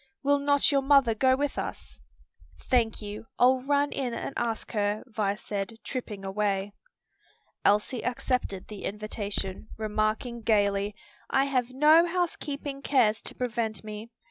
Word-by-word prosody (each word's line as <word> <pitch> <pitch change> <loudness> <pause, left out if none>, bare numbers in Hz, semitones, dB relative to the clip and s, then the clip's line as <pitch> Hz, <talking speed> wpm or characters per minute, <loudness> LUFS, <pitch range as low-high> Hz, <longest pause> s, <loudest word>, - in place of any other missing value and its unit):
Will 285 0 +3
not 285 +1 +3
your 280 -1 +3
mother 270 -4 +5
go 260 +4 +3
with 285 +1 -1
us?" - - -6 0.6
"Thank 225 - +1
you; 210 +2 -7
I'll 255 +1 +5
run 285 +2 +1
in 250 -4 -2
and - - -4
ask 230 -2 -2
her," 205 -1 0
Vi 210 -5 -1
said, 205 0 -4
tripping 210 -7 -5
away. 200 0 -1 0.9
Elsie 210 +4 +2
accepted 250 -6 -2
the 210 -2 -7
invitation, 205 -1 -3
remarking 215 +2 -1
gayly, 205 -2 +2 0.3
"I 270 0 +3
have 255 -3 0
no 305 +6 +6
housekeeping 295 -5 -3
cares 235 -7 +3
to - - -5
prevent 225 -4 -2
me. 215 +1 -7
230 Hz, 140 wpm, -28 LUFS, 210-270 Hz, 0.9 s, no